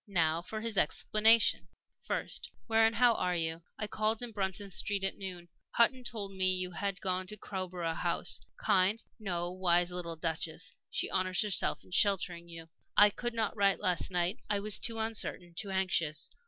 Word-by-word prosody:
Now 165 -4 +1
for 215 +5 -6
his 225 -3 0
explanation: 220 +8 +3 0.3
"First, - - -3 0.2
how 225 -1 +3
and - - -9
where 245 0 +6
are 180 -4 -1
you? 165 0 -2 0.2
I 215 - -3
called 215 +2 -1
in 240 - -4
Bruton 195 -1 -3
Street 200 +1 0
at 195 - -1
noon. 180 -3 -7 0.3
Hutton 250 +2 +3
told 215 -4 -5
me 185 -1 +2
you 185 0 -3
had 195 +3 -2
just - - -19
gone 185 0 -1
to 210 - -7
Crowborough 180 -4 -4
House. - - -1 0.2
Kind 195 +4 +2 0.2
no, 175 -4 -2
wise 175 -1 +2
little 175 -2 -5
Duchess! 165 0 -3 0.2
She - - -1
honors 185 +2 +1
herself 210 -3 0
in - - -20
sheltering 180 -3 +1
you. 165 -1 -10 0.3
"I 210 0 +8
could 240 +3 -4
not 220 -3 -1
write 200 -2 +3
last 180 -4 +1
night 180 +1 0
I 205 -1 +1
was 210 0 +4
too 230 -1 +2
uncertain, 220 -5 -1
too 200 +2 -3
anxious. 185 -5 0
190 Hz, 180 wpm, -32 LUFS, 175-210 Hz, 0.3 s, I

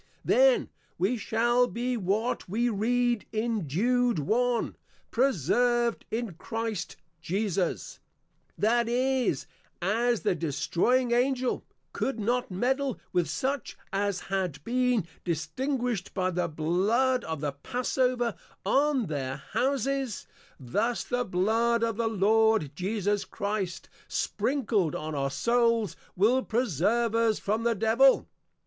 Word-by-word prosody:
Then - - +4 0.3
we 195 +8 +1
shall 240 +3 +2
be, 245 +1 -2
what 215 +1 -1
we 235 +5 +1
read 240 +2 +1
in 220 -5 -1
Jude 240 - +2
1. 235 - 0 0.4
Preserved 240 - +1
in 225 -4 -3
Christ 225 +1 -4 0.3
Jesus: 190 0 -2 0.6
That 235 +2 +2
is, 250 - +1 0.3
as 230 +5 +1
the - - +2
Destroying 170 - +1
Angel, 255 +1 +1 0.3
could 265 -4 -2
not 245 +4 0
meddle 260 +7 0
with 175 -2 +1
such 275 0 -2 0.2
as 200 -1 0
had 185 -7 -3
been 250 -3 +1 0.2
distinguished, 225 - -2
by 185 -1 +1
the 180 0 0
Blood 200 +11 +1
of 160 -2 -4
the 145 0 -1
Passeover 245 - -1 0.3
on 275 +3 +2
their 140 -4 -3 0.2
Houses: 270 -3 0 0.3
Thus 210 - -1
the 245 0 -1
Blood 225 +6 +1
of 230 -2 0
the 230 -1 +1
Lord 220 -5 +3
Jesus 205 +2 -1
Christ, 200 -4 -3 0.2
Sprinkled 220 - 0
on 155 0 -4
our 140 -1 -1
Souls, 230 - +1 0.2
will 230 +8 +3
Preserve 230 - +1
us 230 -2 +2
from 215 +3 -1
the 230 0 +1
Devil. 225 +6 +4
225 Hz, 115 wpm, -28 LUFS, 185-245 Hz, 0.6 s, Then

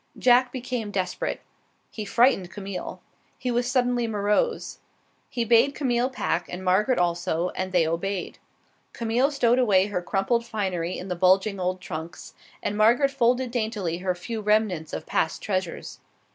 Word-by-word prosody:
Jack 250 0 +4
became 245 -4 -4
desperate. 185 -3 -2 0.5
He 215 - -6
frightened 220 -4 +3
Camille. 195 -1 -7 0.3
He 250 - -2
was 240 +1 0
suddenly 245 -2 +1
morose. 210 - 0 0.5
He 235 -2 -2
bade 235 +5 +4
Camille 250 -3 +1
pack, 180 -9 -2
and 185 +1 -6
Margaret 205 +8 +3
also, 175 0 0
and 185 +1 -4
they 175 -3 +3
obeyed. 180 +4 -3 0.5
Camille 235 +4 +1
stowed 250 -4 +2
away 195 -6 +4
her 200 -3 -2
crumpled 195 +6 0
finery 185 -6 -2
in 185 - -7
the 180 - -2
bulging 190 +3 +3
old 185 0 -2
trunks, 160 -1 -7 0.3
and 205 - -1
Margaret 240 +6 +4
folded 250 -1 +1
daintily 215 -8 -2
her 185 0 -1
few 220 +5 -5
remnants 210 -7 +1
of - - -5
past 160 - -1
treasures. 185 -4 -3
210 Hz, 150 wpm, -25 LUFS, 185-240 Hz, 0.5 s, Jack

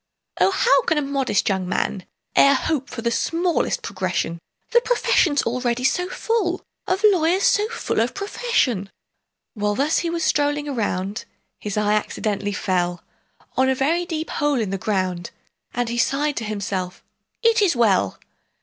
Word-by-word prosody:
"O, - - +5
how 475 +6 +3
can 320 - +1
a - - +2
modest 275 -6 0
young 190 -2 0
man 190 -1 -2 0.3
E'er 280 0 +6
hope 275 0 -1
for 230 - -6
the 235 - +1
smallest 335 +7 0
progression,— 170 +1 -2 0.3
The 475 - +5
profession's 365 - +2
already 245 +1 -1
so 360 +8 +1
full 380 -4 -1 0.2
Of 380 +3 0
lawyers 360 +1 +2
so 420 +1 +3
full 465 - -2
of 235 +3 0
profession!" 340 - 0 0.6
While 210 -1 -1
thus 290 +6 +2
he 340 - -2
was 335 -1 -2
strolling 290 -1 +1
around, 205 -6 -2 0.3
His 210 0 -4
eye 210 0 +2
accidentally 205 -1 -1
fell 180 -2 -1 0.5
On 260 0 +3
a 265 - +2
very 330 +7 0
deep 320 -1 -4
hole 290 -3 +1
in 210 -4 -2
the 195 - -2
ground, 185 -4 -1 0.4
And 245 0 -1
he 235 +1 -2
sighed 290 +4 +1
to 230 - -2
himself, 195 -3 -4 0.4
"It 460 -1 +4
is 370 -8 +3
well!" 200 - +2
260 Hz, 160 wpm, -22 LUFS, 205-335 Hz, 0.6 s, E'er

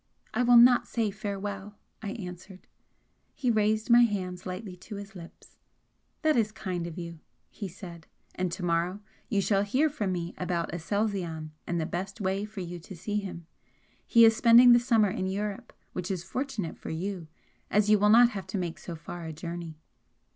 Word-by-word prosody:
"I - - +1
will 245 -1 +6
not 245 +1 +7
say 225 -3 -1
farewell!" 200 0 -5 0.3
I 205 -2 -4
answered. 185 -3 -9 0.7
He 250 -4 +1
raised 215 +1 +1
my 240 +1 +8
hands 185 -5 -1
lightly 185 +1 -6
to 205 +4 -9
his 200 0 -8
lips. 170 -3 -13 0.7
"That 310 -1 +4
is 220 -3 +2
kind 180 -5 -4
of 170 - -8
you!" 170 -2 -7 0.3
he 205 - -6
said 170 -2 -11 0.3
"and 185 -1 -2
to 175 +1 -4
morrow 175 +4 0 0.3
you 200 - +2
shall 195 +1 +2
hear 260 +10 +2
from 210 -10 -2
me 175 -1 -3
about 175 -2 -2
Aselzion 175 -4 -2 0.2
and 175 -1 -1
the 160 - -1
best 190 +6 -5
way 195 +1 -1
for 210 -2 -7
you 175 0 -6
to 185 +3 -11
see 205 +5 -3
him. 185 -5 -5 0.6
He 230 -1 +7
is 225 0 +6
spending 235 +2 +8
the 240 - +8
summer 225 -5 +3
in 190 -3 -2
Europe, 200 +1 -4 0.2
which 180 0 -4
is 185 -3 -2
fortunate 215 - -4
for - - -7
you, 175 +1 -4 0.4
as 210 +1 +3
you 210 - +6
will 210 +1 +4
not 235 +2 +7
have 195 -5 -6
to - - -3
make 175 -3 -3
so 170 - -7
far 170 +1 -8
a 160 - -5
journey." 170 0 -6
195 Hz, 190 wpm, -28 LUFS, 175-215 Hz, 0.7 s, my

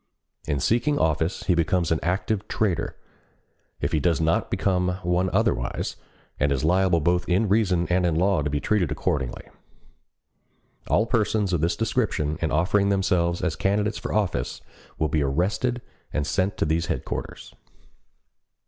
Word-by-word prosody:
In 70 -2 0
seeking 120 - +1
office 80 - 0
he 90 - +2
becomes 85 0 +1
an 80 - +2
active 100 +4 -1
traitor, 90 -7 -1 0.8
if - - -1
he 80 - +2
does 85 -1 +1
not 80 0 +1
become 90 -1 0
one 90 +1 +1
otherwise, - - 0 0.4
and 70 +1 +2
is 70 0 0
liable 90 +1 +3
both 90 +3 0
in 95 +5 +2
reason 95 -4 +2
and 90 +1 +2
in 85 -3 +1
law 90 0 +2
to 75 - -1
be 75 0 -1
treated 90 -4 0
accordingly. 75 -4 -2 1.4
All 110 - +3
persons 110 -4 0
of 85 - +1
this 85 +2 +1
description 105 - -1
in 80 - +1
offering 100 +6 +2
themselves 90 -3 +1
as 90 -3 0
candidates 105 +2 0
for - - -5
office 95 -13 -1 0.4
will 80 - +1
be 75 +1 0
arrested 100 - 0 0.3
and 75 - -1
sent 95 +4 0
to - - +1
these 80 +2 0
Headquarters. - - -5
90 Hz, 155 wpm, -25 LUFS, 80-100 Hz, 1.4 s, liable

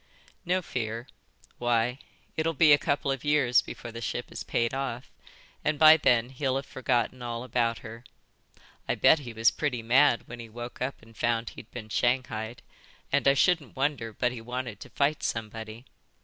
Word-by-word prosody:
"No 180 +1 +1
fear. 115 -4 -4 0.5
Why, 120 +1 +1 0.4
it'll 160 +1 0
be 150 0 +7
a 145 - +5
couple 140 -1 0
of 135 -1 -3
years 145 -5 +4
before 120 - -8
the 115 +1 -7
ship 120 +1 -4
is - - -6
paid 115 +1 0
off, 135 -2 -4 0.5
and 155 -1 +1
by 155 +1 +9
then 120 -6 +3
he'll 135 0 -1
have 135 +1 -2
forgotten 125 -1 -1
all 120 0 -4
about 115 -2 0
her. 115 +1 -9 0.9
I - - +2
bet 160 - +5
he 125 -4 -8
was 115 0 +3
pretty 125 -6 -2
mad 125 +2 +4
when 120 0 -9
he 115 -1 -8
woke 120 +2 -8
up 130 -2 -3
and 115 0 -17
found 115 0 0
he'd 110 - -12
been 110 -3 -8
shanghaied, 120 -1 -1 0.5
and 140 -1 +2
I 140 - +6
shouldn't 165 - +2
wonder 135 -4 -1
but 125 +3 0
he 120 -2 -7
wanted 120 -3 -5
to - - -10
fight 145 +1 0
somebody. 110 +1 -5
125 Hz, 180 wpm, -28 LUFS, 115-135 Hz, 0.9 s, by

